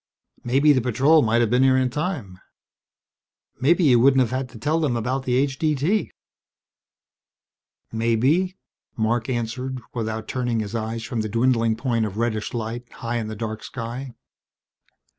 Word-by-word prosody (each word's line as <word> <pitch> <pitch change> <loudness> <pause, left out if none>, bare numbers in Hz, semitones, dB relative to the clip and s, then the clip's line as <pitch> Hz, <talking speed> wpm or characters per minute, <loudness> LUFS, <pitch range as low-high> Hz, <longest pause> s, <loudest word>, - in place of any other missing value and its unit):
"Maybe 140 +5 +4
the 130 - +2
patrol 135 +7 +4
might 115 0 +2
have 115 -2 +1
been 125 +1 +4
here 130 0 +5
in 130 -1 +1
time. 135 - -4 1.2
Maybe 170 +7 +3
you 125 -6 +5
wouldn't 135 +2 +5
have 120 - 0
had 130 0 -2
to 120 - -12
tell 150 +8 0
them 140 -7 0
about 130 +3 -2
the 125 - +1
H.D.T." 145 +7 +1 1.8
"Maybe," 130 - +1 0.4
Marc 115 +2 0
answered 125 +2 -3
without 110 -2 -3
turning 120 -3 -1
his 105 -1 -4
eyes 115 0 -3
from 120 -2 -3
the 110 - -3
dwindling 115 0 +2
point 115 -2 0
of 105 0 -8
reddish 110 -2 -1
light 120 +2 -5
high 120 +1 -3
in 110 -2 -3
the 110 - -5
dark 110 0 -5
sky. 125 +1 -6
120 Hz, 155 wpm, -23 LUFS, 115-135 Hz, 1.8 s, here